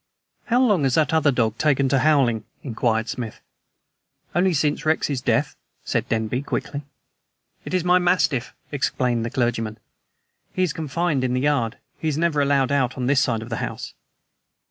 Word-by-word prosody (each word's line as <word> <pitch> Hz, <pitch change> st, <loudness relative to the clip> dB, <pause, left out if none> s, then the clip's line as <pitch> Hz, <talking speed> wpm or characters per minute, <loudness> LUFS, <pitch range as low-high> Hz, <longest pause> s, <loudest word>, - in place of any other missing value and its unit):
"How 245 Hz, +1 st, +2 dB
long 210 Hz, -10 st, +3 dB
has 135 Hz, -3 st, +2 dB
that 160 Hz, 0 st, +2 dB
other 155 Hz, -2 st, +4 dB
dog 115 Hz, -3 st, 0 dB
taken 140 Hz, -3 st, +2 dB
to 135 Hz, 0 st, +3 dB
howling?" 130 Hz, -6 st, +3 dB, 0.2 s
inquired 115 Hz, -3 st, 0 dB
Smith. 115 Hz, -3 st, -5 dB, 0.9 s
"Only 185 Hz, +2 st, +3 dB
since 150 Hz, -2 st, 0 dB
Rex's 155 Hz, -4 st, 0 dB
death," -, -, 0 dB, 0.3 s
said -, -, -1 dB
Denby 115 Hz, +3 st, -1 dB
quickly. 140 Hz, 0 st, -4 dB, 0.8 s
"It -, -, -3 dB
is 180 Hz, -, +1 dB
my 180 Hz, +1 st, +4 dB
mastiff," 175 Hz, -8 st, +1 dB, 0.2 s
explained 125 Hz, -4 st, 0 dB
the 115 Hz, -, -2 dB
clergyman, 115 Hz, -3 st, -1 dB
"and -, -, -44 dB
he 185 Hz, -, +1 dB
is 170 Hz, -5 st, 0 dB
confined 160 Hz, -2 st, -1 dB
in 125 Hz, -1 st, 0 dB
the 125 Hz, -, 0 dB
yard. 135 Hz, -6 st, +1 dB, 0.2 s
He 160 Hz, -, -3 dB
is 150 Hz, -2 st, 0 dB
never 160 Hz, -3 st, +1 dB
allowed 140 Hz, -1 st, +2 dB
on 130 Hz, -2 st, 0 dB
this 135 Hz, +1 st, +3 dB
side 115 Hz, -3 st, 0 dB
of 115 Hz, -, -10 dB
the 115 Hz, -, -3 dB
house." -, -, -5 dB
140 Hz, 170 wpm, -23 LUFS, 120-155 Hz, 0.9 s, other